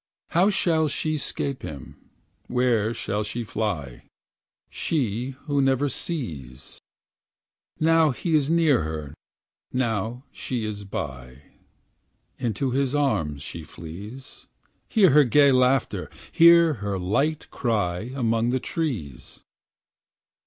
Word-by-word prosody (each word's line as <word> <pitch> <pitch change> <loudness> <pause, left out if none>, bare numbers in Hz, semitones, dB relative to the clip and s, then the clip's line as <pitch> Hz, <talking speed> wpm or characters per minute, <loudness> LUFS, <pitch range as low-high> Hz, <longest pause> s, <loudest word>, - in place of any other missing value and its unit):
How 180 +4 +4
shall 165 -5 +2
she 155 +1 -1
'scape 140 -2 -3
him, 70 -5 -8 0.5
where 120 -3 +1
shall 105 -2 -2
she 110 +3 -4
fly. 95 - -4 0.7
She 125 -3 -2
who 145 -2 +1
never 135 +1 +2
sees? 75 - -6 1.0
Now 160 0 +4
he 160 +5 -2
is 150 -2 +3
near 160 -6 +4
her, 75 -2 -5 0.6
now 120 -1 -1
she 120 -4 -4
is 105 -1 -5
by 70 -7 -6 0.5
— - - -46
Into 120 +4 -1
his 135 +1 0
arms 80 - 0
she 85 - -7
flees. 100 - -10 0.4
Hear 195 - +5
her 150 +2 +7
gay 140 +2 +5
laughter, 130 +1 +2 0.2
hear 170 -1 +7
her 100 -1 -2
light 140 +12 0
cry 105 -3 -1
Among 115 -2 +1
the 130 +1 +1
trees 115 - -4
125 Hz, 115 wpm, -25 LUFS, 100-145 Hz, 1.0 s, her